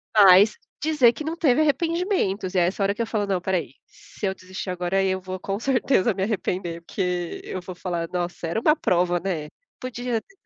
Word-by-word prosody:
Mas 200 +1 +7 0.2
dizer 295 -6 +4
que 310 - -6
não 320 +2 -3
teve 305 -4 +3
arrependimentos, 310 - 0
é 175 -2 +4
essa 195 +2 -1
hora 195 +1 +2
que 210 - -4
eu 230 - -1
falo: 215 -2 -1
"Não, 195 -2 0
espera 185 +1 0
aí, 150 -7 -5
se - - -9
eu 190 - 0
desistir 185 +1 -7
agora, 180 +1 -1
aí 195 0 +3
eu 190 0 0
vou 185 0 -6
com 195 +2 -3
certeza 245 -3 +2
me 190 - -5
arrepender", 180 -4 -2
porque 180 -1 -3
eu 185 - -5
vou 185 +1 -8
falar: 175 -2 -3
"Nossa, 175 -1 -3
era 170 +7 -1
uma 300 +6 +4
prova, 175 - +1
né. 165 -5 -3 0.3
Podia 245 -2 -3
ter 390 - -26
195 Hz, 210 wpm, -24 LUFS, 180-240 Hz, 0.3 s, Mas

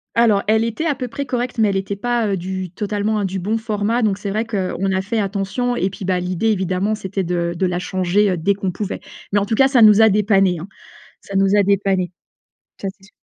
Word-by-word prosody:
Alors 225 -4 +4
elle 220 +1 +3
était 230 +8 -2
à 295 - +1
peu 250 -1 -4
près 280 +4 -5
correcte 245 -1 -2
mais 215 -2 +4
elle 195 - 0
était 195 +1 -3
pas, 240 +2 0
heu, 195 - 0
du 185 0 -5
totalement, 210 +2 -1
hein, 205 - 0
du 190 0 -3
bon 210 +5 -1
format, 220 +1 -1
donc 210 -4 +1
c'est 200 - -4
vrai 215 +2 0
qu'on 195 -3 -2
a 190 0 +1
fait 220 +4 -1
attention 205 +5 -1
et 195 -5 0
puis, 195 - -9
bah, 185 -1 0
l'idée 180 +4 -1
évidemment 190 0 0
c'était 195 -1 -3
de 170 -1 -1
de 185 - 0
la 175 -1 -1
changer, 185 +2 +1
heu, 180 - -1
dès 195 +5 +1
qu'on 195 -1 -2
pouvait. 195 +2 -5 0.3
Mais 205 - +3
en 200 - -1
tout 220 - -1
cas 265 +4 +5
ça 265 -3 +3
nous 215 0 +7
a 220 - +7
dépannés, 195 -3 +3
hein. 170 - -7 0.6
Ça 195 - -6
nous 195 +1 +3
a 205 - +5
dépannés. 195 -2 +1 0.7
Ça 195 - -3
c'est 195 0 -22
sûr. 195 - -19
200 Hz, 250 wpm, -20 LUFS, 190-220 Hz, 0.7 s, nous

